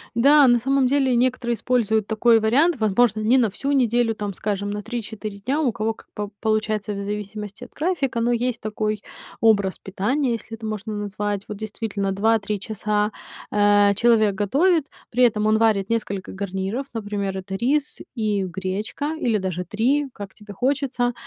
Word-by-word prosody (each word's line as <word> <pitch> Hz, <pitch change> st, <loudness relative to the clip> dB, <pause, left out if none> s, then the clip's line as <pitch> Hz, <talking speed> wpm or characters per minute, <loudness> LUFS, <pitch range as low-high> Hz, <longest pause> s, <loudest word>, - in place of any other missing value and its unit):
Да, 280 Hz, +4 st, +6 dB
на 240 Hz, -1 st, +5 dB
самом 270 Hz, +2 st, +2 dB
деле 265 Hz, -1 st, +2 dB
некоторые 245 Hz, -1 st, +1 dB
используют 220 Hz, -3 st, +1 dB
такой 225 Hz, +2 st, +4 dB
вариант. 275 Hz, +11 st, +3 dB
Возможно, 215 Hz, +1 st, +2 dB
не 230 Hz, +5 st, +4 dB
на 230 Hz, -3 st, +3 dB
всю 275 Hz, +8 st, -3 dB
неделю, 240 Hz, -4 st, +2 dB
там, 205 Hz, -2 st, -5 dB
скажем, 205 Hz, 0 st, -2 dB
на 210 Hz, 0 st, -4 dB
3-4 215 Hz, -3 st, -6 dB
дня, 265 Hz, +9 st, -1 dB
у 280 Hz, -6 st, +2 dB
кого 220 Hz, +1 st, -2 dB
как -, -, -18 dB
по 205 Hz, -1 st, -4 dB
получается 215 Hz, -1 st, 0 dB
в 200 Hz, 0 st, -4 dB
зависимости 210 Hz, +2 st, -6 dB
от 245 Hz, -, -11 dB
графика, 295 Hz, -7 st, -1 dB
но 235 Hz, +1 st, +2 dB
есть 240 Hz, 0 st, -1 dB
такой 215 Hz, -1 st, -2 dB, 0.4 s
образ 200 Hz, -4 st, +3 dB
питания, 235 Hz, +8 st, -1 dB
если 225 Hz, 0 st, -6 dB
это 225 Hz, -1 st, -7 dB
можно 215 Hz, 0 st, -4 dB
так 205 Hz, -, -3 dB
назвать. 205 Hz, 0 st, -3 dB
Вот 210 Hz, -, -6 dB
действительно 210 Hz, -2 st, -3 dB
2-3 210 Hz, +1 st, +1 dB
часа, 210 Hz, 0 st, -1 dB, 0.4 s
а, 205 Hz, -1 st, +4 dB
человек 215 Hz, -2 st, +3 dB
готовит, 285 Hz, -, +2 dB, 0.2 s
при 250 Hz, +2 st, +2 dB
этом 215 Hz, -3 st, +3 dB
он 215 Hz, 0 st, +4 dB
варит 215 Hz, -3 st, +2 dB
несколько 205 Hz, -4 st, -2 dB
гарниров, 195 Hz, +6 st, -3 dB
например, 205 Hz, -3 st, -3 dB
это 190 Hz, 0 st, -5 dB
рис 275 Hz, +8 st, 0 dB, 0.2 s
и 215 Hz, -5 st, 0 dB
гречка 190 Hz, -, -3 dB
или 225 Hz, -6 st, +1 dB
даже 180 Hz, -1 st, -3 dB
3, 260 Hz, -, +1 dB
как 200 Hz, -2 st, -9 dB
тебе 210 Hz, -1 st, -11 dB
хочется. 255 Hz, +1 st, 0 dB
215 Hz, 170 wpm, -23 LUFS, 205-245 Hz, 0.4 s, Да